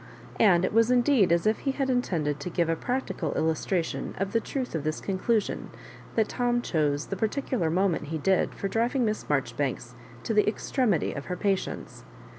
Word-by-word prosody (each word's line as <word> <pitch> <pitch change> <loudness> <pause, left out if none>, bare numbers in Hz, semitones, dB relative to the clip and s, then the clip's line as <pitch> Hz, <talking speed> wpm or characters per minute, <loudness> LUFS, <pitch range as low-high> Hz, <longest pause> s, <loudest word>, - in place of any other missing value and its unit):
And 185 -4 +5
it - - -2
was 225 +1 +4
indeed 245 -5 +4
as 170 +2 +2
if 215 +1 +2
he 275 - -1
had 270 -1 -1
intended 170 - 0
to 160 - -4
give 170 -1 0
a 165 - +2
practical 245 - -2
illustraiion 160 +3 -1
of 195 0 -1
the 230 - +4
truth 255 +2 -4
of 160 -3 -2
this 155 0 -2
con 190 -2 -3
clusion 225 0 0 0.5
that 220 -2 +3
Tom 240 -1 0
chose 150 -3 0
the 195 - -4
particular 220 - -1
moment 180 -1 +1
he 160 +2 -3
did 185 +5 +1
for 195 - -2
driving 235 +5 +1
Miss 215 -1 -2
Marjoribanks 130 -3 -1 0.3
to - - -1
the 210 -1 +3
ex 210 - -3
tremity 225 - +1
of 140 - -5
her 180 - -4
patience. 195 -2 -2
195 Hz, 195 wpm, -27 LUFS, 160-230 Hz, 0.5 s, And